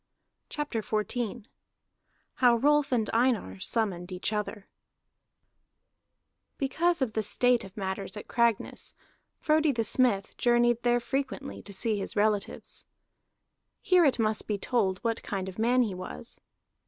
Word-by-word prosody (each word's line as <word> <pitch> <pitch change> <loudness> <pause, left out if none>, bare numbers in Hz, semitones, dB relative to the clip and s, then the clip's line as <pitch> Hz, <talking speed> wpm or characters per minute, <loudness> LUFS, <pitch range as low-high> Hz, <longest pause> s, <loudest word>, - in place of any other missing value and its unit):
CHAPTER 295 -7 -3
XIV 215 +1 -2 0.9
HOW 245 -2 +5
ROLF 290 +4 +3
AND 225 -4 +1
EINAR 225 - +1
SUMMONED 190 -5 -1
EACH 185 +4 -2
OTHER 210 -1 -4 1.9
Because 325 +3 +1
of 225 -4 -3
the 220 - 0
state 245 +3 +3
of 195 +1 -12
matters 195 +1 -4
at 210 - -8
Cragness, 235 -3 0 0.4
Frodi 310 -1 +3
the 230 -4 -1
Smith 215 -3 +2
journeyed 240 -1 +3
there 240 0 +3
frequently 275 +2 -4
to 205 - -11
see 210 +2 0
his 195 - -4
relatives. 210 -1 -1 0.9
Here 365 -4 +4
it 280 -5 +3
must 215 -2 +1
be 210 - -1
told 195 -3 0
what 230 -1 -1
kind 190 -2 -4
of 190 +2 -8
man 245 +3 +3
he 210 -5 -2
was. 180 - -7
230 Hz, 135 wpm, -28 LUFS, 200-250 Hz, 1.9 s, HOW